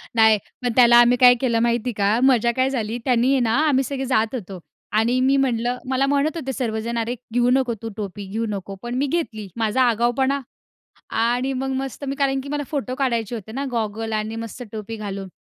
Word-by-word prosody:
नाही, 220 -1 +6 0.3
मग 245 - +1
त्याला 240 -1 +7
आम्ही 240 +1 +5
काय 245 0 +7
केलं 235 -3 +1
माहिती 235 +1 +1
का, 205 +3 +2
मजा 240 -3 +4
काय 260 +1 +2
झाली 230 -3 -2
त्यानी 250 0 +3
आहे 275 - +3
ना, 225 -1 +1
आम्ही 270 -2 +3
सगळे 270 0 -3
जात 225 -1 +1
होतो 195 -5 -7 0.4
आणि 235 +3 +2
मी 270 +1 +3
म्हटलं, 245 -2 0
मला 265 +1 +2
म्हणत 285 +3 +1
होते 270 -4 -4
सर्वजण, 230 -1 -3
"अरे, 230 +2 -1 0.2
घेऊ 245 0 +3
नको 255 -2 +2
तू 225 - -5
टोपी, 205 -1 -5
घेऊ 225 +4 -2
नको." 195 -1 -5
पण 240 +1 -4
मी 275 - +1
घेतली. 250 -10 -3
माझा 225 +3 +1
आगाऊपणा. 245 +4 +2 0.7
आणि 245 +4 0
मग 265 +1 -2
मस्त 270 +1 -6
मी, 275 - -2
कारण 270 -1 +1
की 275 - -9
मला 290 +1 -2
फोटो 275 -4 -2
काढायचे 240 -4 -1
होते 220 -1 -7
ना, 275 +3 -3
गॉगल 225 -1 -3
आणि 215 +1 -2
मस्त 230 +2 -7
टोपी 220 +1 -6
घालून 200 -2 -6
240 Hz, 205 wpm, -22 LUFS, 225-265 Hz, 0.7 s, त्याला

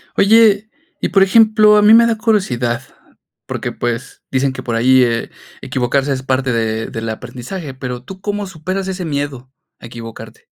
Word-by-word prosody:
Oye, 215 0 +4 0.3
y - - 0
por 195 +1 +4
ejemplo, 215 +1 +5
a 210 - +5
mí 210 +2 +7
me 235 0 +6
da 230 -2 0
curiosidad, 125 - 0 0.6
porque - - -4
pues, 120 0 -4
dicen 135 0 0
que 130 - -7
por 120 -2 -3
ahí, 130 +3 +4
eh, 115 -1 -1 0.3
equivocarse 135 +2 -1
es 130 - -4
parte 130 0 -1
de 110 -1 -1
del 115 0 -5
aprendizaje, 130 - -7
pero, 125 -2 -6
¿tú 190 +4 -11
cómo 205 0 -3
superas 185 +2 -4
ese 185 -1 -4
miedo 140 -4 -4 0.3
a - - -10
equivocarte? 115 -1 -10
135 Hz, 170 wpm, -17 LUFS, 120-195 Hz, 0.6 s, mí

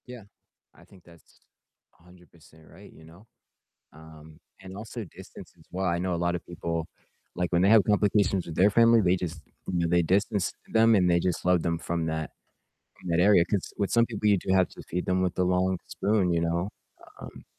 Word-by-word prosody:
Yeah, 125 -3 -10 0.5
I - - -19
think 95 -3 -20
that's 85 -1 -21 0.6
100% 85 -2 -20
right, 100 +4 -15
you 80 - -17
know? 85 +7 -18 0.7
Um, 80 0 -15 0.2
and 95 0 -10
also 110 +1 -7
distance - - -13
as - - -21
well. 95 +1 -3
I 85 -1 0
know 90 0 -2
a - - -3
lot 85 0 0
of 85 - -7
people, 85 -1 -4 0.5
like, 90 -1 -2
when 85 0 +2
they 95 - +4
have 110 -2 +6
complications 100 -2 +1
with 80 - -7
their 95 +5 +4
family, 115 +1 +5
they 90 -2 +2
just, 85 -3 -6 0.3
you 90 - -1
know, 85 - 0
they 85 +1 +3
distance 95 +3 0 0.2
them 115 0 +5
and 90 -3 +3
they 85 0 +3
just 90 0 -2
love 90 -1 +3
them 85 -1 -1
from 85 0 -3
that 80 0 -4 0.7
from - - -9
that 85 0 +2
area 95 -2 +5
'cause 95 +1 -3
with 100 -2 -2
some 115 0 +3
people, 105 -2 -2
you 100 -2 +4
do 95 - -2
have 95 -1 +3
to - - -14
feed 90 +1 -3
them 90 0 +1
with 90 -2 -2
a - - +3
long 90 0 0
spoon, 100 -3 0
you 85 - +1
know? 85 +3 -1 0.5
Um, - - -11
90 Hz, 210 wpm, -26 LUFS, 85-100 Hz, 0.7 s, have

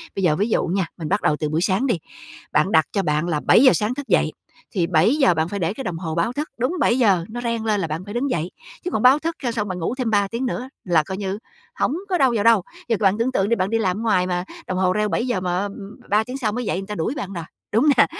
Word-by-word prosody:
Bây 195 - -2
giờ 160 -4 +3
ví 205 +7 0
dụ - - +1
nha, 185 +1 0
mình 160 -3 -5
bắt 200 +2 +1
đầu 150 - +2
từ 150 - -1
buổi 155 +2 0
sáng 200 +8 +1
đi, 235 - +2 0.6
bạn 195 - +2
đặt 160 -1 +5
cho 200 - +1
bạn 155 0 0
là 155 -3 0
7:00 255 - +6
sáng 215 +3 0
thức 285 +1 -6
dậy, - - +2 0.4
thì 180 -7 0
7:00 185 - +3
bạn 160 0 0
phải 200 - -4
để 180 +1 -1
cái 270 - -6
đồng 180 -5 -3
hồ 165 -2 -4
báo 195 +8 0
thức, 295 +4 -3
đúng 255 +7 0
7:00 215 -10 +3
nó 240 +2 -5
reng 230 -2 -2
lên 215 -2 +1
là 175 - -1
bạn 160 +3 -4
phải 205 +2 -8
đứng 260 +3 -1
dậy. 170 -5 -1 0.3
Chứ 360 - -2
bạn 215 - -1
báo 260 +3 +7
thức 330 +2 -3
cho 240 -3 -1
xong 210 -3 -2
bạn 185 -1 -4
ngủ 175 +7 -2
thêm 255 -3 -2
3 205 -2 +2
tiếng 235 +5 -2
nữa 250 +1 -3 0.2
là 170 -4 +3
coi 190 - -4
như 195 0 -3 0.4
hổng 285 - +1
có 365 -2 +1
đâu 265 -3 +4
vào 205 -3 0
đâu. 230 -4 +5 0.3
Giờ 230 - +2
bạn 200 0 +3
tưởng 240 +3 0
tượng 195 -5 +1
đi, 235 - +2
bạn 185 -1 -1
đi 225 - +2
làm 190 -4 0
ở - - -4
ngoài 200 -6 +2
mà 180 -1 -1 0.2
đồng 185 - -2
hồ 185 -1 +2
reo 210 +2 0
7:00 240 -2 -1
mà, 180 -1 -1
á, - - -1
ừm, 200 0 -8
3 210 +2 +3
tiếng 250 +4 -6
sau 220 -6 -1
mới 245 +3 -3
dậy 185 - -1
người 195 - -5
ta 210 - -5
đuổi 205 - -2
bạn 200 -9 -5
rồi, 170 -3 -5 0.3
đúng 225 +6 +3
hông 300 - +6
nè? - - +7
205 Hz, 305 wpm, -22 LUFS, 180-240 Hz, 0.6 s, báo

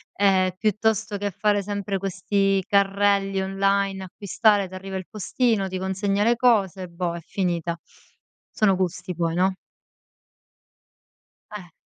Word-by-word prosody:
ehm, 190 -2 +3
piuttosto 215 0 0
che 205 +1 -2
fare 205 +2 +1
sempre 200 -1 -3
questi 195 +1 0
carrelli 200 0 +2
online, 195 0 0
acquistare, 205 +1 +1
t'arriva 190 +1 -6
il 185 - -6
postino, 215 0 0
ti 185 - -4
consegna 195 +2 -1
le 235 +1 +4
cose, 200 -6 +2
boh, 170 0 -3
è 170 - -7
finita. 170 -2 -2 0.8
Sono 200 -3 +3
gusti 180 0 -3
poi, 165 0 -1
no? 190 +1 +2 2.0
Eh. 180 -5 -9
195 Hz, 120 wpm, -24 LUFS, 185-205 Hz, 2.0 s, le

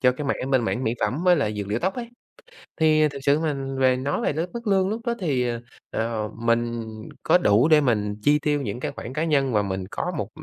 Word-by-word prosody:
cho 125 -1 +4
cái 145 +2 -5
mảng 135 -1 -2
bên 130 -4 +3
mảng 125 +3 -1
mỹ 115 - 0
phẩm 155 +8 -1
với 180 -1 +6
là 140 -8 0
dược 105 -2 -4
liệu 110 +3 0
tóc 190 +7 -1
ấy. 240 -2 -5 0.7
Thì 155 -1 +5
thực 140 0 -8
sự 145 +2 +3
mà 155 -3 -1 0.2
về 130 -1 +4
nói 135 +3 -2
về - - 0
cái 165 +4 -2
mức 235 -2 -6
lương 190 -1 +3
lúc 225 +2 -4
đó 235 - +1
thì, 135 -8 0
à, 120 -1 -3 0.3
à, 115 0 -2 0.2
mình 115 0 0 0.4
có - - +5
đủ 115 - +4
để 155 -2 +6
mình 105 -5 0
chi 150 +1 +4
tiêu 145 -1 0
những 115 -1 -4
cái - - -3
khoản 130 - -8
cá 155 - -1
nhân 140 -6 +1
và 105 - +3
mình 95 -1 -4
có - - -2
một - - -3
135 Hz, 255 wpm, -24 LUFS, 115-155 Hz, 0.7 s, với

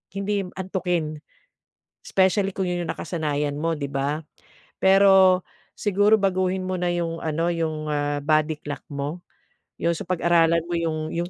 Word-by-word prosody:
hindi 200 0 -1 0.2
antukin. 180 -5 -2 0.9
Specially 195 +1 +2
kung 190 - 0
'yon 175 0 -2
'yong - - -2
nakasanayan 150 -4 -2
mo, 165 0 0
'di 140 -1 -4
ba? 140 +3 -1 0.6
Pero, 190 -1 +6 0.4
siguro 205 +1 +3
baguhin 185 -1 0
mo 185 0 -2
na 180 - 0
'yung 170 -1 -2
ano, 160 +2 -1
'yung, 155 -2 -2
ah, 145 0 -1
body 155 0 +2
clock 145 -1 -5
mo, 145 +5 -4 0.6
'yun, 170 - +2
so - - -5
pag-aralan 170 -2 +3
mo 175 - -2
'yung 155 -2 -2
'yung 170 +1 -2
170 Hz, 150 wpm, -24 LUFS, 155-185 Hz, 0.9 s, Pero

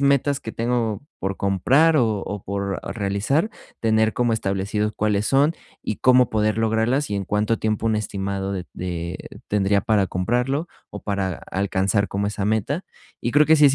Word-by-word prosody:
metas 140 0 +3
que 110 - -6
tengo 115 -2 -1 0.2
por 95 0 -3
comprar 135 - +3
o 110 -6 +2
o 100 0 -5
por 100 0 -3 0.2
realizar, 105 - 0 0.3
tener 110 -1 +3
como 120 -1 +1
establecidos 105 0 -1
cuáles 105 0 +1
son 145 +4 +3 0.3
y 105 - -2
cómo 125 -1 +4
poder 110 0 +1
lograrlas 115 +4 +1
y 100 - 0
en 100 - -2
cuánto 105 +4 0
tiempo 110 +1 -1
un 110 -1 +2
estimado 100 -2 -3
de 95 -2 -3
de 85 -1 -4 0.3
tendría 100 -1 +2
para 100 -1 +2
comprarlo 125 - 0 0.2
o - - -8
para 100 -3 -1 0.2
alcanzar 100 +1 +1
como 100 +1 -1
esa 105 -1 -3
meta 110 - 0 0.4
y 120 - -2
creo 150 +1 +6
que 160 - +6
sí 150 - +5
es 135 - +4
105 Hz, 175 wpm, -23 LUFS, 100-125 Hz, 0.4 s, creo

